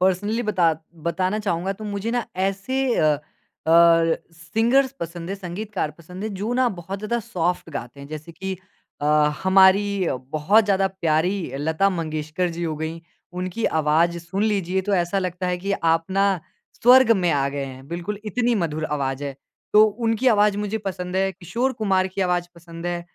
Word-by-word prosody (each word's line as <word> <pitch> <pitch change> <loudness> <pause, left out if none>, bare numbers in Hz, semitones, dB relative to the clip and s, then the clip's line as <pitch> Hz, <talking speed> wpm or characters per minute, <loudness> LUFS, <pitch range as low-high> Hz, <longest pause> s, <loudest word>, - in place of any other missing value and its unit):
Personally 205 +5 +1
बता 180 -6 +2 0.3
बताना 185 +5 0
चाहूँगा। 190 -2 -1
तो 215 +2 -10
मुझे 205 +2 -3
ना 240 -1 0
ऐसे 195 +8 -1 0.2
अ, - - +3
अ, 150 -1 +2 1.1
सिंगर्स 225 +11 +1
पसंद 170 0 -5
है, - - -1
संगीतकार 195 -2 -4
पसंद 180 +3 -10
है, - - -1
जो 205 +4 -3
ना 255 -1 +3
बहुत 190 +4 -6
ज़्यादा 215 +4 -1
सॉफ्ट 175 -4 -1
गाते 140 -2 -7
हैं। 140 - -9
जैसे 155 +2 -8
कि 190 +3 -5 0.4
अ, - - -3 0.4
हमारी 190 0 +4 0.3
बहुत 195 +9 +4
ज़्यादा 195 -1 +2
प्यारी 175 -2 0
लता 160 +6 +2
मंगेशकर 155 0 -2
जी 170 - -4
हो 160 -2 -2
गईं। 160 +2 -4 0.4
उनकी 185 +5 -3 0.2
आवाज़ 165 +3 +2
सुन 175 +4 -3
लीजिए 190 -4 +1
तो 200 - +3
ऐसा 175 +1 +1
लगता 185 -1 -2
है 180 0 0
कि 195 +3 -2
आप 165 -3 +2
ना 195 +1 +2 0.6
स्वर्ग 250 0 +7
में 180 -2 +1
आ 140 -1 +1
गए 140 -1 -2
हैं। 130 0 -10
बिल्कुल, 175 +5 -4
इतनी 235 +3 +1
मधुर 160 -6 -1
आवाज़ 140 -2 -2
है। 140 -1 -4 0.4
तो 210 +1 +8 0.2
उनकी 225 +3 +1
आवाज़ 205 0 +3
मुझे 210 +1 -2
पसंद 180 -1 -4
है, 195 0 +2
किशोर 230 +8 -2
कुमार 190 -3 +2
की - - -2
आवाज़ 180 -2 +1
पसंद 170 0 -9
है, 175 0 -2
185 Hz, 175 wpm, -23 LUFS, 165-205 Hz, 1.1 s, तो